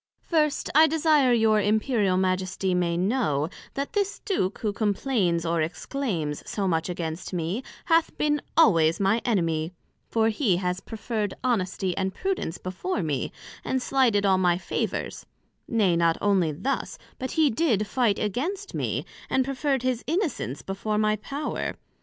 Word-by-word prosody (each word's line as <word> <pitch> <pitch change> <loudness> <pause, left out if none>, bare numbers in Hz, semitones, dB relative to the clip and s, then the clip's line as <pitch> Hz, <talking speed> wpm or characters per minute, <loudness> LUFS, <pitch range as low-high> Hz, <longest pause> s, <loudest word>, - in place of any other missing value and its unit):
First, 305 -3 +1
I 315 +2 +7
desire 305 -4 +3
your 220 -2 +4
Imperial 210 -2 +2
Majesty 185 0 0
may 175 -1 +1
know, 180 - +1 0.3
that 275 +1 -3
this 405 -1 0
Duke 210 - 0
who 210 -2 -2
complains 200 -5 0
or 165 0 +1
exclaims 165 - -2
so 200 -2 -1
much 165 -1 0
against 170 0 -4
me, 175 +6 -2 0.2
hath 330 0 +2
been 295 -1 +1 0.2
always 165 - +5
my 200 +4 +2
enemy; 165 -6 0 0.4
for 225 -1 +2
he 215 -5 +1
has 180 0 -1
preferred 215 -1 -3
Honesty 190 -6 0
and 190 -1 -2
Prudence 375 - -2
before 185 - -3
me, 145 -4 -2 0.3
and 260 - 0
slighted 245 -6 +2
all 190 -1 +4
my 175 -2 +3
favours; 185 - -3 0.4
nay, 205 -7 +2
not 170 -1 +3
onely 190 -6 +2
thus, 265 - -3 0.2
but 260 0 -4
he 315 -3 +4
did 225 -5 +1
fight 215 -1 +1
against 340 - -2
me, - - -2 0.2
and 260 -1 +2
preferred 275 -1 -1
his 255 -2 0
Innocence 315 - -2
before 210 +2 -2
my 215 0 +2
Power. 280 +8 -4
210 Hz, 150 wpm, -26 LUFS, 180-265 Hz, 0.4 s, I